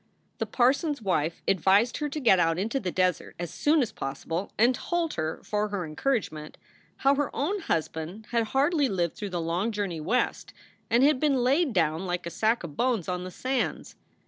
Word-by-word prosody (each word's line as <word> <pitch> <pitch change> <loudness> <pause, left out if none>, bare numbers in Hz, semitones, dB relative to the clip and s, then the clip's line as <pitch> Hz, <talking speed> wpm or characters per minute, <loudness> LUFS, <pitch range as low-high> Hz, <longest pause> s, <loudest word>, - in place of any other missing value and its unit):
The - - -1
parson 265 +6 +2
s 285 - -10
wife 165 -4 -1
advised 195 +6 +3
her 295 -1 -2
to 305 - -4
get 225 -9 +5
out 165 -1 +2
into 225 +8 -1
the 190 - -3
desert 185 -2 0
as 175 -1 -5
soon 300 -1 +3
as 230 - -4
possible, 165 +7 -4
and 240 +4 +5
told 340 +4 -2
her, 160 0 -3
for 210 0 -1
her 200 -4 -3
encourage 225 - -1
ment, 155 -1 -9 0.4
how 275 +1 +4
her 285 0 0
own 375 +9 0
husband 165 - -3
had 230 -1 +2
hardly 280 +4 +2
lived 175 -5 -1
through 205 - -5
the 180 -2 -3
long 170 +7 -1
journey 200 -6 -3
West 240 +11 -1 0.4
and 235 +3 +4
had 285 -2 +4
been 275 -4 +2
laid 280 +4 +3
down 165 -2 0
like 175 0 -2
a 170 - -4
sack 220 +6 +1
of 155 -4 -7
bones 240 - 0
on 180 0 -3
the - - -5
sands. 255 +8 -2
210 Hz, 200 wpm, -27 LUFS, 175-265 Hz, 0.4 s, get